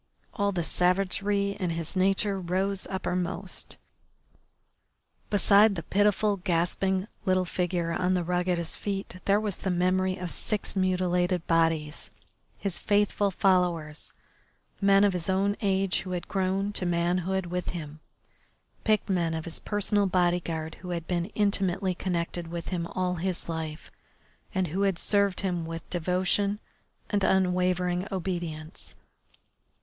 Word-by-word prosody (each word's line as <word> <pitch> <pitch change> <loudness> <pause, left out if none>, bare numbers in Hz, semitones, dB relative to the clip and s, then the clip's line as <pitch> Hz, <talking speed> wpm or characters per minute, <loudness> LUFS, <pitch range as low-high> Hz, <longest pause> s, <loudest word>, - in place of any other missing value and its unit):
All 200 0 +1
the 175 -3 -1
savagery 195 +3 +1
in 180 -3 0
his 165 +2 -3
nature 195 +1 +2
rose 190 +2 -1
uppermost. 185 -1 -3 1.5
Beside 205 +1 +5
the 170 - -4
pitiful, 205 +2 +2
gasping 185 +2 0 0.2
little 185 -2 +2
figure 175 -1 -1
on 185 +1 +1
the 180 - +1
rug 180 +1 0
at 180 - +2
his 170 -1 -2
feet 195 -2 -4
there 200 +1 +4
was 210 -3 -3
the 190 - -3
memory 185 +1 +1
of 180 -2 -4
six 215 -2 -2
mutilated 180 -2 +1
bodies, 165 -2 +1 0.5
his 195 -4 -3
faithful 205 -1 +2
followers, 175 -5 +1 0.7
men 195 0 +5
of 200 -2 +4
his 180 0 -2
own 195 +2 +2
age 195 -2 +2
who 185 0 -5
had 175 - -4
grown 195 +1 0
to 185 - 0
manhood 175 +2 0
with 180 +1 -3
him, 155 -3 -6 0.8
picked 215 -1 +2
men 170 -4 +1
of 160 - -4
his 170 - -5
personal 205 -1 +1
bodyguard 175 -3 0
who 180 - -7
had 170 -2 -3
been 175 -1 -1
intimately 195 -2 +1
connected 175 -1 -3
with 170 0 -5
him 170 -2 -2
all 180 0 -1
his 180 +1 -2
life, 160 -1 -5 0.6
and 185 -3 +1
who 185 +6 -2
had 195 -3 +2
served 200 +1 +2
him 180 -3 -1
with 165 0 -6
devotion 185 +4 +1 0.5
and 205 -2 +1
unwavering 180 -1 +2
obedience. 170 -4 -5
185 Hz, 140 wpm, -28 LUFS, 175-195 Hz, 1.5 s, Beside